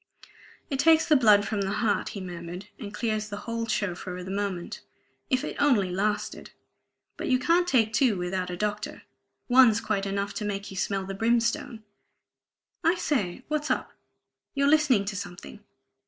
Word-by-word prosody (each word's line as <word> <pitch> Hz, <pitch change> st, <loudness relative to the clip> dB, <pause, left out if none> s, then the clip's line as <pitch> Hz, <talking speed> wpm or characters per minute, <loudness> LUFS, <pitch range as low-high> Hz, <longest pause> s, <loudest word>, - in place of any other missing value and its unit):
"It 270 Hz, -, -1 dB
takes 320 Hz, +1 st, +5 dB
the 310 Hz, -, +4 dB
blood 210 Hz, -6 st, +5 dB
from 205 Hz, -2 st, -1 dB
the 195 Hz, -, -1 dB
heart," 210 Hz, 0 st, 0 dB
he -, -, -5 dB
murmured, 175 Hz, +2 st, -7 dB
"and 210 Hz, -5 st, -7 dB
clears 215 Hz, -1 st, -2 dB
the 205 Hz, -, -5 dB
whole 230 Hz, -1 st, -3 dB
show 205 Hz, -4 st, 0 dB
for 180 Hz, +1 st, -7 dB
the 185 Hz, -, -6 dB
moment. 195 Hz, -3 st, -3 dB, 0.5 s
If 260 Hz, -1 st, +1 dB
it -, -, -4 dB
only 225 Hz, -11 st, +3 dB
lasted! 210 Hz, +3 st, -2 dB, 0.7 s
But -, -, -4 dB
you 255 Hz, -, +4 dB
can't 340 Hz, +7 st, +2 dB
take 225 Hz, -8 st, +2 dB
two 230 Hz, -3 st, +3 dB
without 180 Hz, +1 st, -2 dB
a 175 Hz, -, -4 dB
doctor; 210 Hz, +1 st, -3 dB, 0.4 s
one's 245 Hz, -3 st, +6 dB
quite 200 Hz, -3 st, -1 dB
enough 200 Hz, +1 st, -2 dB
to 215 Hz, -, -4 dB
make 200 Hz, -1 st, -4 dB
you -, -, -8 dB
smell 195 Hz, 0 st, -1 dB
the 195 Hz, -, -5 dB
brimstone... 230 Hz, +1 st, 0 dB, 1.0 s
I 330 Hz, +2 st, +4 dB
say, 250 Hz, -, -1 dB
what's 305 Hz, 0 st, -2 dB
up? -, -, -1 dB, 0.6 s
You're 280 Hz, 0 st, +3 dB
listening 285 Hz, -9 st, +4 dB
to 195 Hz, 0 st, -4 dB
something! 195 Hz, +2 st, -8 dB
210 Hz, 170 wpm, -27 LUFS, 195-255 Hz, 1.0 s, one's